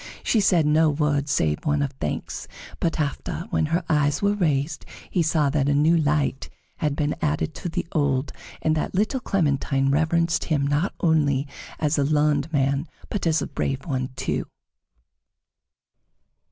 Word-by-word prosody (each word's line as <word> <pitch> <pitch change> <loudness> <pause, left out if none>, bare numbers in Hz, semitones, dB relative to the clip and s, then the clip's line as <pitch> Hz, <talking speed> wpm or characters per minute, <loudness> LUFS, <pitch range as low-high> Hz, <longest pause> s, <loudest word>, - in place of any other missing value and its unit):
She 225 - +2
said 180 -6 +3
no 155 +1 +4
word 145 -1 0
save 75 - +1
one 145 -1 +1
of 140 - -2
thanks, 135 - -4 0.3
but 165 -1 -1
after, 155 +3 -3
when 155 - +1
her 170 +3 0
eyes 145 -2 +2
were 200 0 +2
raised, 155 -6 0 0.3
he 180 - +2
saw 155 -3 +2
that 145 -1 +1
a 145 - +2
new 155 +4 +4
light 150 -4 0 0.3
had 150 -2 -1
been 150 0 0
added 75 +1 0
to 175 - -5
the - - -2
old, 145 -3 0 0.3
and 155 0 +2
that 155 - -2
little 215 +7 +1
Clementine 140 - +1
reverenced 165 +3 +1
him 145 -4 +1
not 145 +6 0
only 145 -4 +2 0.3
as 150 -2 +1
a - - +3
learned 150 +1 +1
man, 140 +1 +1 0.2
but 195 -4 -1
as 160 -2 +2
a - - -2
brave 135 -2 -3
one, 130 -4 -2
too. - - -2
150 Hz, 165 wpm, -24 LUFS, 140-160 Hz, 0.3 s, no